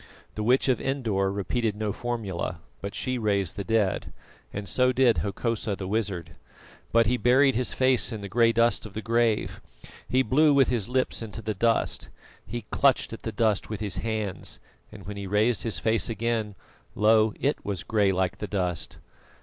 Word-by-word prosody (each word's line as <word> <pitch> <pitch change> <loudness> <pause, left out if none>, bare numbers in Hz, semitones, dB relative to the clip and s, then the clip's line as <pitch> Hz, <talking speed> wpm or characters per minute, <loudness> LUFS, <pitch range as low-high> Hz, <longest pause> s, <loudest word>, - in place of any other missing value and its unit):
The 105 - -4
Witch 125 +6 +3
of 130 -4 +2
Endor 110 -8 0
repeated 105 +2 -1
no 105 -1 -2
formula, 105 -8 -3 0.2
but 100 +1 -5
she 130 -1 -2
raised 100 -5 0
the 100 - -4
dead; 105 -3 0 0.4
and 100 0 -5
so 125 +4 +2
did 125 -3 +3
Hokosa 105 0 -2
the 95 -1 -6
wizard. 95 -7 -2 0.6
But 115 0 +4
he 125 +3 +1
buried 130 +3 +4
his 125 +1 -1
face 130 -1 +2
in 110 -2 -5
the 100 - -5
grey 115 +3 +3
dust 115 -1 +2
of 100 - -16
the 110 - -4
grave, 115 -1 +1 0.5
he 130 +1 +3
blew 145 +5 +4
with 135 -2 +4
his 120 -3 -1
lips 130 -1 0
into 115 0 -7
the 110 +1 -2
dust, 115 +3 0 0.3
he 120 +2 -6
clutched 140 -4 +2
at 115 - -8
the 110 - -4
dust 110 -1 0
with 110 - -4
his 100 -4 -1
hands, 110 -3 -3 0.3
and 100 -4 -12
when 100 +1 -6
he 100 -1 -5
raised 105 +4 +2
his 115 - 0
face 110 +1 +1
again, 110 -2 -2 0.4
lo! 110 0 +4
it 140 +2 0
was 100 -3 -3
grey 105 -3 +2
like 95 -1 -1
the 105 - -4
dust. 90 -6 -2
110 Hz, 185 wpm, -26 LUFS, 100-120 Hz, 0.6 s, But